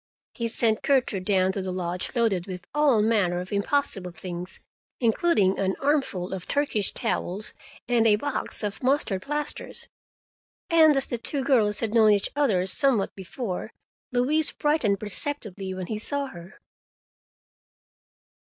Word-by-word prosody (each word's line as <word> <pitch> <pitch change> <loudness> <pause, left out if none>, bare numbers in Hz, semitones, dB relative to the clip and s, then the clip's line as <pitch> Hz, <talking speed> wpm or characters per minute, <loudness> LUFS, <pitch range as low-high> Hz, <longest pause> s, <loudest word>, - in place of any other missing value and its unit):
He 235 -2 -2
sent 225 -1 +3
Gertrude 245 -9 +1
down 190 -2 +2
to 195 - -3
the 190 - -4
lodge 180 +4 -4
loaded 210 -7 +1
with 180 -1 -7
all 285 -8 +4
manner 200 -6 +2
of 180 +3 -6
impossible 200 -3 0
things, 175 +1 -7 0.4
including 225 - +2
an 190 -1 0
armful 270 -11 0
of 185 -2 -6
Turkish 280 -9 0
towels 205 +6 -2 0.3
and 235 -2 +3
a 210 - +6
box 280 0 -2
of 205 -1 -3
mustard 255 -7 +1
plasters, 295 +5 -5 0.8
and 315 -3 +6
as 270 - +2
the 240 - -4
two 270 +4 -1
girls 225 -7 +2
had 225 -2 -2
known 220 -2 +6
each 200 -1 0
other 220 -11 +2
somewhat 230 0 +2
before, 195 +2 -5 0.4
Louise 285 +6 +1
brightened 275 -10 +1
perceptibly 210 - -4
when 185 -1 -4
she 215 +3 -4
saw 285 +5 0
her. 175 0 -12
215 Hz, 140 wpm, -26 LUFS, 190-275 Hz, 0.8 s, a